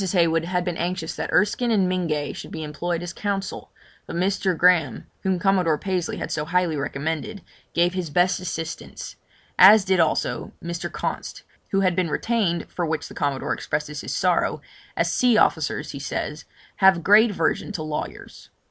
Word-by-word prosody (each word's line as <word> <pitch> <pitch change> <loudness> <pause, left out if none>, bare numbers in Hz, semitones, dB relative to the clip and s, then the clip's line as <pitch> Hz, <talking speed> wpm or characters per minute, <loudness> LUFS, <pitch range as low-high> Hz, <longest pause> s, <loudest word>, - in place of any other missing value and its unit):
Heywood 165 -2 +2
had 180 0 -1
been 175 -2 -2
anxious 175 -1 -2
that - - -4
Erskine 210 +4 +2
and 200 -5 +3
Mingay 165 -5 -1
should - - -8
be 160 - -6
employed 170 +3 -3
as 175 -1 -6
counsel, 200 -1 -4 0.4
but - - -6
Mr. 185 0 0
Graham, 165 -8 +3 0.2
whom 190 -1 0
Commodore 180 -4 +2
Pasley 185 -1 -2
had - - -5
so 150 - -1
highly 170 0 +1
recommended, 160 +8 -3 0.3
gave 175 +1 +3
his 180 -3 -3
best 180 +4 +2
assistance; 165 -2 -6 0.4
as 200 +2 +9
did 190 -2 +2
also 160 -2 0
Mr. 170 0 -5
Const, - - -4 0.3
who 195 - +1
had 185 -2 +2
been 180 -2 0
retained, 200 -2 0
for 175 - -4
which 160 -1 -2
the - - -10
Commodore 140 -3 -1
expresses 150 0 -3
his - - -6
sorrow, 180 -2 +1 0.4
as - - +1
sea 245 -3 +4
officers, 150 -5 +1
he 140 - -7
says, 150 +2 -4 0.3
have 190 -2 +6
a - - -4
great 210 +7 +6
aversion 185 +2 -1
to 160 - -4
lawyers. 155 -1 -6
175 Hz, 175 wpm, -23 LUFS, 160-190 Hz, 0.4 s, as